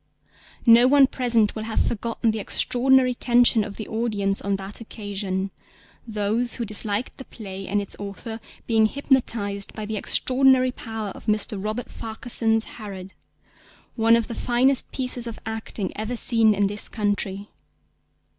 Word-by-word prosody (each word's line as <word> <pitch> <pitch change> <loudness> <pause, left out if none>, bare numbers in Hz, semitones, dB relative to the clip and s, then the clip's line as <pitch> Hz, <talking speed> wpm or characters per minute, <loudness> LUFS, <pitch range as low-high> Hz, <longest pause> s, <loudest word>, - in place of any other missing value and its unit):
No 235 +1 +7
one 280 0 +6
present 235 -5 +1
will 220 - -5
have 225 - -2
forgotten 230 0 -1
the 220 - -4
extraordinary 255 +4 +3
tension 240 -2 +3
of 205 -1 -8
the 215 - -6
audience 210 -3 -1
on 200 0 -1
that 195 +3 -6
occasion, 200 -3 -4 0.6
those 220 +2 -1
who 235 - -3
disliked 210 +2 -1
the 265 - -8
play 195 -3 -8
and 205 +1 0
its 200 - -6
author 205 +3 -7 0.3
being 220 -2 +3
hypnotised 225 -7 -1
by 215 - -6
the 215 0 -4
extraordinary 255 +3 +3
power 225 -4 -6
of 195 - -12
Mr. 210 -2 0
Robert 215 +3 -4
Farquharson's 225 0 0
Herod, 195 -5 -9 0.8
one 225 0 +4
of 230 -1 0
the - - -6
finest 255 +3 +1
pieces 250 -2 0
of 230 - -6
acting 220 -2 -5
ever 220 +3 -4
seen 225 -3 +4
in 200 +1 +1
this 205 +1 +1
country. 205 -1 -2
220 Hz, 150 wpm, -23 LUFS, 205-240 Hz, 0.8 s, No